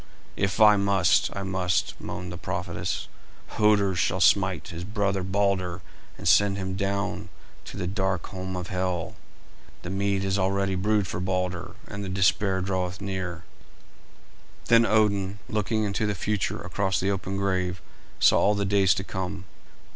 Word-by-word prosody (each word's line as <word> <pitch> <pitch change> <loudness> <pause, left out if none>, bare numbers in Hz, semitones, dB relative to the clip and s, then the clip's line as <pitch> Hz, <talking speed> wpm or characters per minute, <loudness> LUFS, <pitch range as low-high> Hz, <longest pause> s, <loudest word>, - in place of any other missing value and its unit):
"If 95 +1 -1
I 105 -1 +7
must, 100 -2 +3
I 100 - -3
must," 95 -2 0
moaned 90 0 -6
the 90 - -6
prophetess. - - -3 0.4
"Hoder 105 -2 +3
shall 90 +1 0
smite 95 0 +3
his 85 -1 -6
brother 100 -1 -1
Balder 95 -2 0 0.3
and - - -5
send 100 -1 +5
him 95 -1 -3
down 100 +1 -2 0.4
to - - -8
the - - -2
dark 95 -1 -1
home 95 -1 -5
of 90 0 -5
Hel. 90 -2 -2 0.7
The 90 - -5
mead 100 0 0
is 95 +1 0
already 100 0 +1
brewed 105 +2 +1
for 85 - -4
Balder, 90 -1 -2
and 100 0 -6
the 95 - -4
despair 95 0 +2
draweth 95 0 -2
near." 95 -3 -4 1.3
Then 115 -1 +6
Odin, 100 -2 +2
looking 110 +1 0
into 105 +1 -1
the 105 - -1
future 105 +3 -1
across 95 -5 -1
the 95 +2 +1
open 95 0 -3
grave, 90 -2 -1 0.4
saw - - +5
all 105 - +3
the 100 0 0
days 95 -1 +3
to 95 - -3
come. 95 0 -5
95 Hz, 155 wpm, -26 LUFS, 95-100 Hz, 1.3 s, I